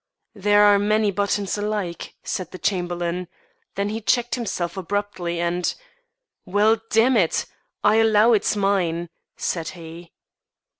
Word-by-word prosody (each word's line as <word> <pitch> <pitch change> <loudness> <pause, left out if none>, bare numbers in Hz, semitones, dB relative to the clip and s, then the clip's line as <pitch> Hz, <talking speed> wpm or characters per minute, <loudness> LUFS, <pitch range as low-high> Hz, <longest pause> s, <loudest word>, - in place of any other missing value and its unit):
"There 205 +1 +3
are 205 -1 +6
many 210 0 +2
buttons 200 +1 -1
alike," 205 -5 -3
said 185 -3 -4
the - - -9
Chamberlain. 175 -1 -2 0.5
Then 200 +1 -1
he 220 +2 -4
checked 240 +2 +1
himself 190 -8 -3
abruptly 190 -2 -3
and 175 +1 0 0.7
"Well, 215 +3 +2
damn 235 +4 +4
it! 180 -7 +2 0.4
I'll 220 +2 +5
allow 220 +2 +5
it's 215 0 +2
mine," 180 -4 0 0.3
said 165 -2 -2
he. 165 +1 -11
200 Hz, 130 wpm, -23 LUFS, 175-210 Hz, 0.7 s, are